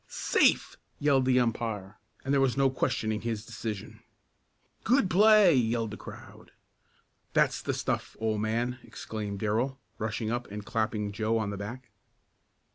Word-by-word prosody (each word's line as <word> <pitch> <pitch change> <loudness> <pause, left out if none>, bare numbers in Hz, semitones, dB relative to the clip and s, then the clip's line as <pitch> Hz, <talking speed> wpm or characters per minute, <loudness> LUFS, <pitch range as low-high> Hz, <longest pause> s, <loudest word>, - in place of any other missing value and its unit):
"Safe!" - - +2 0.2
yelled 140 -3 +3
the 130 -1 +4
umpire, 110 -5 -2 0.3
and 135 - 0
there 140 - +4
was 135 -1 +2
no 135 -1 +4
questioning 115 -5 -1
his 115 -2 -3
decision. 110 -3 -6 0.8
"Good 250 -3 +3
play!" 210 0 +7
yelled 115 -3 +1
the - - -5
crowd. - - -12 0.8
"That's - - +2
the - - -2
stuff, - - -3
old 110 -1 0
man!" 120 +3 -1
exclaimed 105 -2 -6
Darrell, 115 +6 -1 0.2
rushing 110 0 -2
up 120 0 -3
and 105 0 -7
clapping 110 -2 -1
Joe 110 +2 0
on 105 -2 -1
the - - -4
back. 115 +4 -7
115 Hz, 145 wpm, -29 LUFS, 110-130 Hz, 0.8 s, play